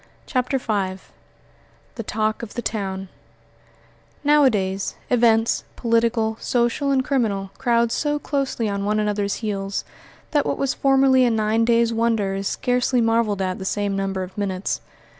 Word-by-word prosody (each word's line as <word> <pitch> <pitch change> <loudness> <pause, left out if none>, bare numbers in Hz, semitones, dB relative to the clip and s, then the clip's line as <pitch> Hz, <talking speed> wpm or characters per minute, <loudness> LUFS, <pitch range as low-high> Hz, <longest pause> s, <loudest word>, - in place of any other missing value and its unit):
CHAPTER 255 0 0
V 200 -6 -2 0.9
THE 230 - -5
TALK 215 0 -1
OF 230 -3 -8
THE 240 - -3
TOWN 195 -3 -3 1.2
Nowadays, 220 -10 +2 0.2
events, 230 -2 +3
political, 230 -1 +1
social, 240 +3 0
and 265 -2 +2
criminal, 205 -8 0
crowd 235 -1 +2
so 295 +2 0
closely 275 -6 -2
on 200 -1 -2
one 210 +1 +1
another's 205 -1 0
heels 195 -1 -3 0.5
that 290 -2 +3
what - - -2
was 275 -1 0
formerly 270 -1 +4
a 245 - +4
nine 220 0 +1
days' 235 0 +3
wonder 225 -4 +1
is 195 0 -2
scarcely 250 +2 +1
marvelled 225 -4 +1
at 185 -1 -2
the - - -5
same 200 +1 -1
number 195 -1 -2
of 185 0 -9
minutes. 195 -2 -2
225 Hz, 145 wpm, -22 LUFS, 200-245 Hz, 1.2 s, formerly